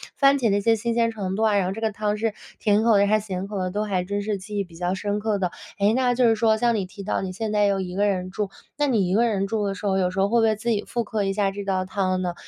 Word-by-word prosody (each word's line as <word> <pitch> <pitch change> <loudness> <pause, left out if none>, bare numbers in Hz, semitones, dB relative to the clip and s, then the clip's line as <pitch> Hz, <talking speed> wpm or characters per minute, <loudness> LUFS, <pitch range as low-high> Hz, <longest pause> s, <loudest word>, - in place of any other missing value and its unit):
番 275 0 +4
茄 235 -4 +2
那 200 +1 +2
些 225 +2 +3
新 235 +2 -1
鲜 230 -1 +2
程 195 -4 -4
度 220 - 0
啊， 210 -2 +3
然 195 - +2
后 190 - -2
这 225 - -7
个 220 - 0
汤 210 0 -1
汁， 220 0 -1 0.2
甜 210 0 +2
口 225 -3 +5
的 200 - +4
还 215 +1 +3
是 210 - -10
咸 190 -1 -4
口 200 -1 -4
的， 185 - -1
都 205 +3 -2
还 190 -4 -1
真 200 +2 -2
是 210 -1 -2
记 205 +2 -7
忆 200 - +1
比 175 -3 -16
较 180 +1 -1
深 205 +2 -2
刻 210 -1 0
的。 180 -2 -1 0.3
诶， 200 +1 +3
那 250 -1 +2
就 245 -2 +4
是 225 - +3
说 220 0 +3
像 235 +2 +2
你 205 -4 -1
提 195 +2 -10
到 200 - -1
你 185 -1 -4
现 215 +3 -3
在 210 -1 +3
又 195 -1 +1
一 180 -1 -5
个 205 +1 +2
人 185 -2 -1
住， 205 -1 -2 0.3
那 295 -1 +2
你 205 -8 +1
一 - - 0
个 235 +4 +3
人 195 -3 0
住 210 0 -1
的 195 - -2
时 205 - -8
候， 190 -1 +2
有 180 -1 +2
时 190 +1 -1
候 200 - +2
会 235 +2 +3
不 225 - +4
会 215 - +2
自 220 +3 -4
己 210 -2 +1
复 240 -1 -1
刻 210 -1 -2
一 195 0 0
下 200 -1 +1
这 200 +1 -6
道 190 -1 0
汤 185 -1 -1
呢？ 180 -1 -2
205 Hz, 365 characters per minute, -24 LUFS, 195-220 Hz, 0.3 s, 口